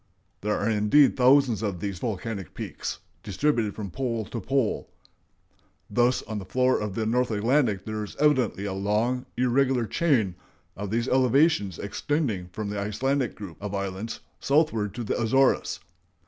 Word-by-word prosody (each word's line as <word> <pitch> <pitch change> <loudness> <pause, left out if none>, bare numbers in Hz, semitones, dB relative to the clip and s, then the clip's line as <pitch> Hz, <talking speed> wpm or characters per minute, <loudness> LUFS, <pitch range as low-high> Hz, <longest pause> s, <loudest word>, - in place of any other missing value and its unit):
There 105 +1 0
are 100 - -1
indeed 110 +6 +4
thousands 130 -4 +4
of 100 -5 -2
these 100 -1 -4
volcanic 105 -5 -4
peaks - - -5 0.2
distributed 110 - 0
from 100 -4 -6
pole 115 -3 -2
to 115 +3 -5
pole.... 135 -5 0 1.0
Thus 120 +3 +2
on 110 -2 -5
the 95 - -8
floor 130 +6 +2
of 105 -2 -4
the 110 - -1
North 125 +3 +1
Atlantic 110 -2 +1
there 110 0 -3
is 105 - -8
evidently 130 -9 +2
a 100 - -2
long, 105 +6 0
irregular 125 0 +2
chain 120 - +1 0.4
of 100 0 -5
these 115 +3 0
elevations 130 - +3
extending 110 - -2
from 105 +3 -4
the 105 - -3
Icelandic 125 +5 -1
group 95 -6 -9
of 100 0 -4
islands 100 +3 -4 0.2
southward 140 - +1
to 120 - -4
the 110 - -1
Azores. 135 +4 +2
110 Hz, 155 wpm, -26 LUFS, 100-130 Hz, 1.0 s, indeed